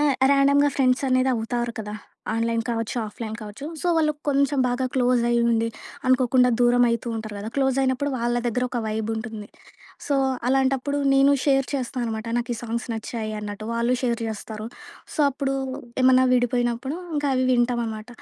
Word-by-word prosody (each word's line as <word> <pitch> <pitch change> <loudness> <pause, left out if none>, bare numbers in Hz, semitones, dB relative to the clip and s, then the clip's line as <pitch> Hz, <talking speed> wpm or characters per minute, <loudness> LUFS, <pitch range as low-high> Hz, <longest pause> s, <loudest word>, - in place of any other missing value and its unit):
ఆహ్, 290 -2 +3 0.2
ర్యాండమ్‌గా 280 +1 +4
ఫ్రెండ్స్ 255 -1 +2
అనేది 255 0 +3
అవుతారు 235 +1 -2
కదా! 210 -1 -5 0.4
ఆన్లైన్ 230 0 0
కావచ్చు, 230 +1 -2
ఆఫ్లైన్ 220 +1 -6
కావచ్చు. 215 +8 -8
సో, - - -3
వాళ్ళు 305 -1 +3 0.2
కొంచెం 280 0 +2
బాగా 245 +1 -1
క్లోజ్ 250 -2 +3
అయ్యి 235 0 +3
ఉండి, 230 0 +1 0.4
అనుకోకుండా 255 -1 +4
దూరమైతూంటారు 235 -3 +1
గదా! 210 - -5
క్లోజైనప్పుడు 265 +1 +1
వాళ్ళ 240 +1 0
దగ్గర 250 +2 0
ఒక 245 - -2
వైబుంటుంది. 220 0 -4 0.6
సో, 285 - +1 0.3
అలాంటప్పుడు 270 +2 +1 0.2
నేను 275 +1 +5
షేర్ 270 -2 +3
చేస్తాననమాట, 235 -4 -3
నాకు 240 0 -2
ఈ - - -8
సాంగ్స్ 235 +1 -4
నచ్చాయి 220 0 -4
అన్నట్టు. 210 +1 -6
వాళ్ళు 235 +2 +1
షేర్ 235 -1 0
జెస్తారు. 215 0 -6 0.5
సో, - - 0
అప్పుడు 275 0 -2 0.5
ఏమన్నా 255 0 +6
విడిపోయినప్పుడు 245 +3 0 0.2
ఇంకా 290 0 0
అవి 255 - +2
వింటామానమాట. 235 -2 0
245 Hz, 150 wpm, -24 LUFS, 225-265 Hz, 0.6 s, ఏమన్నా